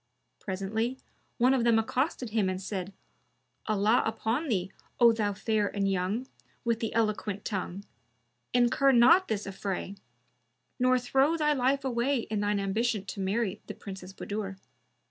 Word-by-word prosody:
Presently 215 Hz, +6 st, -2 dB, 0.4 s
one 255 Hz, +2 st, +4 dB
of 255 Hz, -3 st, +2 dB
them 235 Hz, -1 st, +4 dB
accosted 250 Hz, +1 st, -1 dB
him 210 Hz, -4 st, +1 dB
and 185 Hz, 0 st, -2 dB
said, 190 Hz, -1 st, -4 dB, 0.8 s
"Allah 215 Hz, +2 st, +3 dB
upon 225 Hz, +7 st, -1 dB
thee, 190 Hz, -6 st, -1 dB, 0.3 s
O 235 Hz, -1 st, +8 dB
thou 210 Hz, -2 st, 0 dB
fair 210 Hz, +1 st, 0 dB
and 200 Hz, 0 st, -1 dB
young, 195 Hz, +6 st, -1 dB, 0.4 s
with 230 Hz, -1 st, +1 dB
the 225 Hz, -, -2 dB
eloquent 215 Hz, -2 st, -1 dB
tongue! 195 Hz, -1 st, -4 dB, 0.7 s
incur 250 Hz, +3 st, +4 dB
not 335 Hz, +11 st, +6 dB
this 210 Hz, -2 st, -2 dB
affray; 195 Hz, 0 st, -4 dB, 0.9 s
nor 255 Hz, 0 st, +4 dB
throw 270 Hz, +6 st, +2 dB
thy 300 Hz, -1 st, +2 dB
life 270 Hz, +1 st, +1 dB
away 250 Hz, +1 st, +1 dB
in 215 Hz, -, 0 dB
thine 205 Hz, 0 st, +1 dB
ambition 210 Hz, +1 st, 0 dB
to 200 Hz, -, -6 dB
marry 200 Hz, +1 st, -1 dB
the -, -, -6 dB
Princess 190 Hz, -2 st, -9 dB
Budur. 195 Hz, 0 st, -5 dB
220 Hz, 145 wpm, -29 LUFS, 195-245 Hz, 0.9 s, O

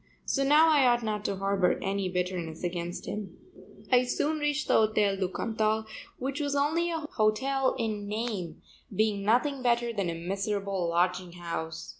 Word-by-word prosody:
So 275 Hz, -, +1 dB
now 300 Hz, +4 st, +6 dB
I 285 Hz, -4 st, +5 dB
ought 240 Hz, -1 st, +3 dB
not 210 Hz, -1 st, -2 dB
to 200 Hz, -, 0 dB
harbor 195 Hz, -1 st, +1 dB
any 195 Hz, -1 st, -1 dB
bitterness 180 Hz, -3 st, -3 dB
against 175 Hz, 0 st, -3 dB
him. 205 Hz, -4 st, -6 dB, 0.5 s
I 250 Hz, 0 st, +6 dB
soon 300 Hz, +5 st, -1 dB
reached 295 Hz, 0 st, 0 dB
the -, -, +2 dB
Hotel 215 Hz, -2 st, +3 dB
du 190 Hz, -1 st, -1 dB
Cantal 220 Hz, +2 st, 0 dB, 0.3 s
which 270 Hz, +3 st, -3 dB
was 285 Hz, -1 st, -1 dB
only 315 Hz, +5 st, +1 dB
a 325 Hz, -1 st, -2 dB
hotel 260 Hz, +5 st, +1 dB
in 215 Hz, -4 st, -2 dB
name, 210 Hz, -6 st, -4 dB, 0.3 s
being 210 Hz, 0 st, +1 dB
nothing 255 Hz, +6 st, +2 dB
better 240 Hz, -1 st, +1 dB
than 200 Hz, -5 st, -1 dB
a 165 Hz, -, -3 dB
miserable 195 Hz, +1 st, -2 dB
lodging 180 Hz, +1 st, 0 dB
house. 165 Hz, -2 st, -5 dB
215 Hz, 165 wpm, -29 LUFS, 185-255 Hz, 0.5 s, now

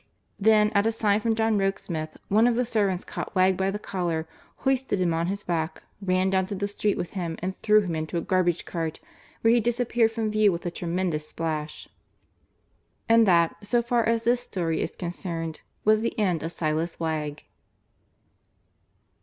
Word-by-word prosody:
Then, 210 Hz, 0 st, +4 dB
at 205 Hz, +1 st, +2 dB
a -, -, +3 dB
sign 210 Hz, -2 st, +2 dB
from 225 Hz, 0 st, 0 dB
John 220 Hz, -1 st, +2 dB
Rokesmith, 170 Hz, -5 st, -2 dB
one 220 Hz, +4 st, +4 dB
of 240 Hz, -, +2 dB
the 250 Hz, +1 st, +1 dB
servants 200 Hz, -6 st, 0 dB
caught -, -, -6 dB
Wegg 185 Hz, 0 st, +4 dB
by 190 Hz, +1 st, 0 dB
the 200 Hz, -, -2 dB
collar, 175 Hz, -6 st, -2 dB, 0.3 s
hoisted 265 Hz, -6 st, 0 dB
him 175 Hz, -2 st, +2 dB
on 165 Hz, +1 st, 0 dB
his 200 Hz, +2 st, -3 dB
back, 165 Hz, -1 st, -2 dB, 0.2 s
ran 185 Hz, 0 st, +1 dB
down 190 Hz, -1 st, +1 dB
to 200 Hz, -, -4 dB
the 200 Hz, +1 st, -2 dB
street 205 Hz, 0 st, -1 dB
with 175 Hz, -, -4 dB
him 170 Hz, -4 st, -4 dB
and 185 Hz, +2 st, -4 dB
threw 215 Hz, 0 st, +5 dB
him 180 Hz, -4 st, -3 dB
into 155 Hz, +2 st, -3 dB
a -, -, 0 dB
garbage 175 Hz, -1 st, +1 dB
cart, 165 Hz, -2 st, -3 dB, 0.4 s
where 225 Hz, 0 st, +5 dB
he 240 Hz, -, +5 dB
disappeared 235 Hz, 0 st, +1 dB
from 225 Hz, -1 st, -2 dB
view 215 Hz, -1 st, +4 dB
with 170 Hz, 0 st, -5 dB
a 175 Hz, -, -1 dB
tremendous 170 Hz, -3 st, -2 dB
splash. 155 Hz, -2 st, -4 dB, 1.2 s
And 230 Hz, -1 st, +5 dB
that, 170 Hz, -2 st, +4 dB
so 235 Hz, +3 st, +1 dB
far 240 Hz, 0 st, +1 dB
as 230 Hz, 0 st, +1 dB
this 240 Hz, +2 st, +2 dB
story 170 Hz, -8 st, -2 dB
is -, -, -3 dB
concerned, 170 Hz, -2 st, -5 dB, 0.2 s
was 215 Hz, 0 st, +4 dB
the 230 Hz, -, -2 dB
end 185 Hz, -7 st, +1 dB
of 165 Hz, -, -4 dB
Silas 160 Hz, +1 st, -2 dB
Wegg. 155 Hz, -2 st, -3 dB
190 Hz, 185 wpm, -26 LUFS, 170-220 Hz, 1.2 s, threw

